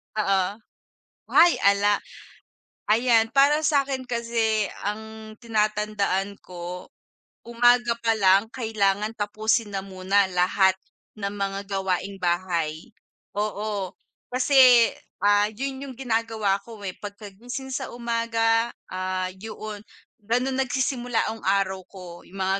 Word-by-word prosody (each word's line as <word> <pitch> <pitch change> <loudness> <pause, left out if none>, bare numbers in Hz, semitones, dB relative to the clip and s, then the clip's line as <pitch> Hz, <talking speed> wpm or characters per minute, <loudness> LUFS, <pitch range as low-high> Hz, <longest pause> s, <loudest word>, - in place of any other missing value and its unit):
Oo. 195 -3 +2 0.8
Ay 345 +1 +5
ala. 200 +1 +4 0.9
Ayan 225 +1 +4
para 290 +3 +4
sa'kin 275 -3 +1
kasi 230 -3 0 0.2
ang 220 +1 -6
tinatandaan 210 -3 -1
ko 180 0 -7 0.6
umaga 240 0 +3
pa 225 -1 +2
lang 195 0 +5
kailangan 210 -3 0
tapusin 215 +1 0
na 195 - -2
muna 190 +1 +1
lahat 185 +1 +3 0.4
ng 200 -1 -3
mga 195 -1 -3
gawaing 195 0 -2
bahay. 170 -1 -1 0.5
Oo, 205 -2 -2 0.4
kasi, 255 -2 +6 0.3
ah, 205 0 +4
yun 270 +4 -5
yung 265 -2 -9
ginagawa 225 -5 0
ko, 225 -3 -11
eh, 185 - -4
pagkagising 210 +6 -8
sa 265 0 -3
umaga, 230 -1 +1 0.2
ah, 185 0 -2
yoon, 215 0 -7 0.4
gano'n 250 +4 0
nagsisimula 250 -2 -1
ang 225 0 -6
araw 190 -1 +1
ko, 180 -3 -11
yung 195 +1 -8
mga 190 +1 +1
215 Hz, 110 wpm, -25 LUFS, 195-235 Hz, 0.9 s, kasi